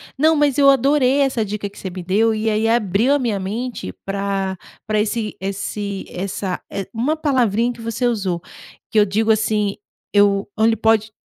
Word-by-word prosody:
não, 315 +4 +4
mas 290 -2 +2
eu 275 -1 +7
adorei 275 0 +3
essa 265 -5 +1
dica 210 0 -4
que 200 +1 -15
você 190 - -5
me 180 0 -7
deu, 215 +5 +2
e 215 +1 -2
aí 220 0 +1
abriu 225 +1 +2
a - - +4
minha 235 -7 -1
mente 215 - -4
pra 195 -1 -2 0.3
pra 215 0 0
esse 215 0 -1
esse 200 +1 -4
essa 190 0 -4
eh, 195 -2 -4
uma 250 +7 0
palavrinha 245 -6 +1
que 235 - -12
você 230 +2 -2
usou, 200 -7 0 0.5
que 220 - +4
eu 205 - +5
digo 215 +3 +1
assim: 215 -2 +1 0.4
"Eu 205 -1 +3
ele 225 +1 +4
pode 220 0 +2
215 Hz, 180 wpm, -20 LUFS, 200-240 Hz, 0.5 s, eu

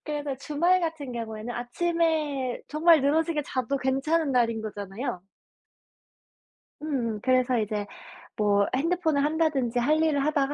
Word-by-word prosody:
그래서 295 -2 -3
주말 335 +6 +2
같은 320 -6 -4
경우에는 225 0 -5
아침에 300 -1 -1
정말 315 +1 +5
늘어지게 310 +2 +1
자도 255 +1 -1
괜찮은 275 +4 0
날인 230 -3 +1
거잖아요. 205 +1 -5 1.6
음음. 245 -8 -2
그래서 255 -1 +2
이제 210 -1 -2 0.5
뭐 205 -1 +2
핸드폰을 315 0 +1
한다든지 295 -6 0
할 305 +6 +2
일을 285 -3 +1
하다가 290 -2 +1
275 Hz, 300 characters per minute, -26 LUFS, 240-310 Hz, 1.6 s, 정말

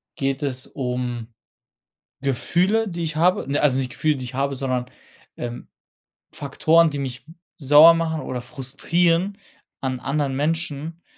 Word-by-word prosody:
geht 135 +1 -2
es 130 -2 -2
um 125 -3 -3 0.9
Gefühle, 180 - +1
die 170 -2 -4
ich 155 -1 -3
habe 180 +3 +3
ne, 145 - +1
also 135 -3 +3
nicht 130 -2 -2
Gefühle, 155 -1 +1
die 130 - -6
ich 125 +1 -8
habe, 140 +1 0
sondern, 130 -2 -2 0.5
ähm, 120 0 -6 0.7
Faktoren, 160 +4 +3
die 145 - -4
mich 125 -3 -5 0.3
sauer 150 +3 +8
machen 160 -1 -1
oder 125 -4 -5
frustrieren 170 +9 0 0.4
an 130 -2 -3
anderen 135 0 -1
Menschen, 160 +2 -2
140 Hz, 140 wpm, -23 LUFS, 130-165 Hz, 0.9 s, sauer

